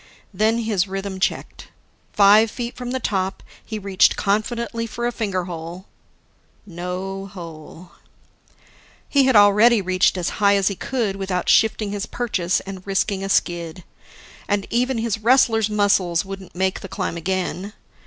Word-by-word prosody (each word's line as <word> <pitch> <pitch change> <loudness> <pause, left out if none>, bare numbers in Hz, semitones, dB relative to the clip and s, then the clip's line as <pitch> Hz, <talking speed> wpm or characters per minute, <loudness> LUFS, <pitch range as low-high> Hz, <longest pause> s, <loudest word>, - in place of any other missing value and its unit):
Then 220 +4 +2
his 215 -5 0
rhythm 195 0 -5
checked. 190 - -3 0.4
Five 210 +2 +6
feet 240 +2 -5
from 245 -1 -6
the 260 +1 -2
top, 190 -4 -2 0.2
he 220 - -6
reached 195 -2 +3
confidently 230 +3 -1
for 235 +2 -4
a 240 - 0
finger 200 -6 -2
hole... 170 +1 -7 0.8
No 190 +2 -5
hole. 170 -1 -11 1.2
He 280 -2 +3
had 260 -2 +3
already 210 +3 +6
reached 185 0 +1
as 180 -1 -1
high 200 0 +5
as 195 0 +2
he 200 - -4
could 220 -3 -2
without 190 -2 -2
shifting 215 -2 +3
his 200 -1 -4
purchase 195 -7 -1
and 190 -1 -8
risking 195 0 0
a 195 - -4
skid 170 -2 -1 0.6
and 205 -1 0
even 250 +2 +1
his 225 -1 -1
wrestler's 225 -2 +3
muscles 200 -5 +2
wouldn't 195 -2 -9
make 190 +1 0
the 195 - -9
climb 190 -2 -3
again. 185 +3 -3
195 Hz, 150 wpm, -21 LUFS, 185-220 Hz, 1.2 s, Five